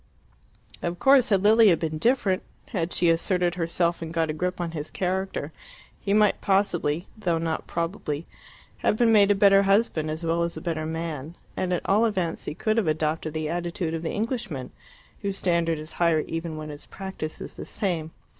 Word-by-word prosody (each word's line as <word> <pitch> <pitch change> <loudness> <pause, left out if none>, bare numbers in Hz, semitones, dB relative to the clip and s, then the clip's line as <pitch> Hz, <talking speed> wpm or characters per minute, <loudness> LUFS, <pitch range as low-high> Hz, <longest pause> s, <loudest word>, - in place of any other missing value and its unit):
Of 175 0 -2
course, 270 0 +5
had 195 -2 +3
Lilia 215 -4 +6
been 155 -1 -3
different 210 -3 +2 0.3
had 180 -6 -2
she 170 -2 +3
asserted 175 +1 +2
herself 170 0 0
and 165 -1 -5
got 165 -2 0
a - - -4
grip 180 +4 -2
on 170 -1 -2
his 155 -2 -5
character 185 -4 -2 0.5
he 200 - -3
might 210 0 +4
possibly 180 -5 +1
though 180 -6 0
not 165 -1 -2
probably 165 -3 -3 0.5
have 210 - +1
been 235 -1 +4
made 205 -2 +6
a 205 - +5
better 195 -1 +6
husband 195 -6 +2
as 155 +2 -4
well 165 +1 +1
as 170 -1 -2
a - - -3
better 160 -2 -2
man, 160 -1 -4 0.2
and 185 - -1
at 180 - -1
all 210 +4 +4
events 185 -7 -1
he - - -4
could 215 +5 0
have 215 -7 +2
adopted 155 0 -1
the 155 -1 -1
attitude 175 0 -2
of 165 - -2
the 165 - -3
Englishman, 215 - -3 0.5
whose 200 -2 -2
standard 170 -3 +1
is 155 +1 -7
higher 165 -3 +2
even 165 0 -4
when 155 0 -6
his 145 0 -9
practice 190 -5 -6
is - - -8
the - - -7
same. 175 -7 -2
170 Hz, 190 wpm, -26 LUFS, 160-195 Hz, 0.5 s, Lilia